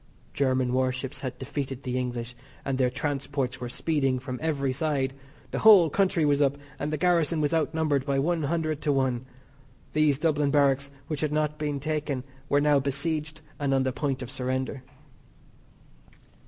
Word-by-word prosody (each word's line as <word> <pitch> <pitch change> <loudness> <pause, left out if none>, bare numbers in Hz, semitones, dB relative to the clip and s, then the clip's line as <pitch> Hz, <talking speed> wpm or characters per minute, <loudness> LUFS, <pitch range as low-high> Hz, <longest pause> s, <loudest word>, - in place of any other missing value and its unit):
German 130 -2 +1
warships 130 0 -1
had 130 -2 -4
defeated 135 -1 -4
the 125 -1 -3
English, 125 -1 -3 0.3
and 135 - 0
their 130 -1 +2
transports 135 -1 -2
were 125 - -4
speeding 135 -1 0
from 125 0 -5
every 140 -4 0
side. 135 -2 0 0.4
The - - -2
whole 195 -8 +7
country 185 -4 +2
was 145 0 +3
up, 140 0 +2 0.2
and 145 +1 -2
the 155 - -1
garrison 170 -1 +2
was 150 0 +1
out 155 -1 +1
numbered 150 -4 +1
by 140 0 0
one 165 +4 +1
hundred 155 0 -1
to 150 - +1
one. 130 -2 0 0.7
These 150 -2 +3
Dublin 150 -2 +1
barracks 140 -1 +3 0.2
which 155 -3 -3
had 155 -1 0
not 150 0 0
been 145 -2 -2
taken 145 -3 -2 0.3
were 145 0 +3
now 145 -1 +4
besieged 155 +3 -2 0.2
and 140 -2 +1
on 135 - +2
the 130 - 0
point 135 -1 -2
of 125 - -7
surrender. 130 0 -2
140 Hz, 170 wpm, -27 LUFS, 130-155 Hz, 0.7 s, whole